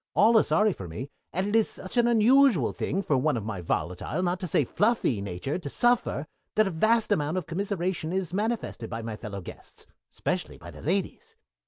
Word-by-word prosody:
All 225 +3 +5
are - - +5
sorry 210 -1 +2
for 95 - -8
me, 130 - -7 0.2
and 190 +4 -1
it 210 - 0
is 225 -1 +4
such 190 - -7
an 240 -1 +4
unusual 235 - +5
thing 195 - -2
for 145 - +1
one 140 0 +1
of 105 - -4
my 105 -5 -4
volatile, 90 - -2
not 180 0 0
to 185 - -3
say 150 - +3
fluffy, 205 - +1
nature 100 - -3
to 155 -5 -6
suffer 240 - +1 0.3
that 215 - +4
a 195 - -1
vast 220 +7 +2
amount 150 +4 +1
of 180 - -2
commiseration 180 -2 -2
is 185 -2 -2
manifested 210 - -2
by 115 0 -5
my 110 -1 -4
fellow 105 -3 -7
guests, - - -12 0.3
especially - - -3
by - - -11
the - - -12
ladies. 185 +3 -2
180 Hz, 205 wpm, -27 LUFS, 130-210 Hz, 0.3 s, All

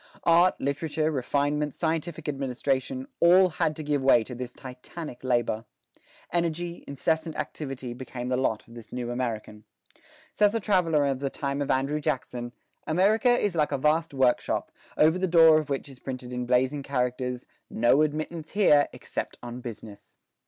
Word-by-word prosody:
Art, 170 +2 +4
literature, 155 +2 -1
refinement, 145 +1 0
scientific 165 -1 -2
administration, 135 - -2
all 180 +2 +6
had 155 -1 -1
to 155 - -6
give 145 -1 0
way 130 -4 +5
to 125 - -9
this 125 0 -6
Titanic 130 +2 -9
labor. 120 -3 0 0.7
Energy, 170 0 -2
incessant 160 +3 -1
activity, 135 -4 -5
became 125 0 -6
the 125 - +1
lot 125 -4 -1
of 115 - -15
this 115 -2 -11
new 120 -1 -4
American. 115 -4 -4 0.7
Says 210 +1 +3
a - - +2
traveler 175 -8 +2
of 135 -2 0
the 140 0 -1
time 140 +1 -3
of 140 - -2
Andrew 140 +3 +1
Jackson, 120 -3 -3 0.4
"America 205 +9 +3
is 205 -6 0
like 150 -2 +1
a 140 - 0
vast 155 +4 +1
workshop, 130 -3 +1 0.3
over 160 +4 +4
the 190 - +1
door 165 -2 +7
of 155 - -6
which 140 0 -2
is 135 -2 -13
printed 130 -2 -6
in 125 0 -3
blazing 130 +3 +2
characters, 125 -2 -2 0.2
'No 120 +5 +3
admittance 155 +1 -2
here, 150 -8 +5
except - - -5
on 120 +1 -7
business.'" 105 -3 -10
140 Hz, 160 wpm, -27 LUFS, 125-160 Hz, 0.7 s, door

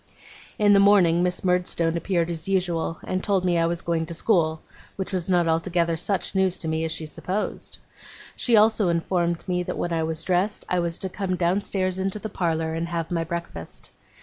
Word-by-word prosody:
In 205 -1 +5
the 200 - +6
morning 190 -4 +5
Miss 180 0 -1
Murdstone 180 -2 +1
appeared 170 0 0
as 165 0 -5
usual, 175 -4 0
and 185 0 -2
told 195 -3 +1
me 175 -2 +2
I 165 - +3
was 170 0 -3
going 165 -1 -1
to 170 - -5
school; 160 -5 +1 0.3
which 190 0 -5
was 180 -1 -2
not 175 -2 +3
altogether 165 +1 +1
such 180 +3 -1
news 190 -2 +2
to 160 - -5
me 160 0 -1
as 160 - -2
she 160 - -3
supposed. 185 +6 -4 0.6
She 235 -3 +3
also 215 -2 +4
informed 170 0 0
me 180 -1 0
that 180 - -4
when 175 - -2
I 165 - 0
was 160 0 -2
dressed, 185 +4 0
I 180 - +1
was 170 -1 -1
to 190 - -4
come 185 -1 -2
downstairs 185 +1 0
into 195 +2 -1
the 220 +1 -6
parlour, 165 -4 -1
and 165 +1 -2
have 170 -1 -3
my 170 -1 0
breakfast. 165 - -6
175 Hz, 200 wpm, -24 LUFS, 165-190 Hz, 0.6 s, the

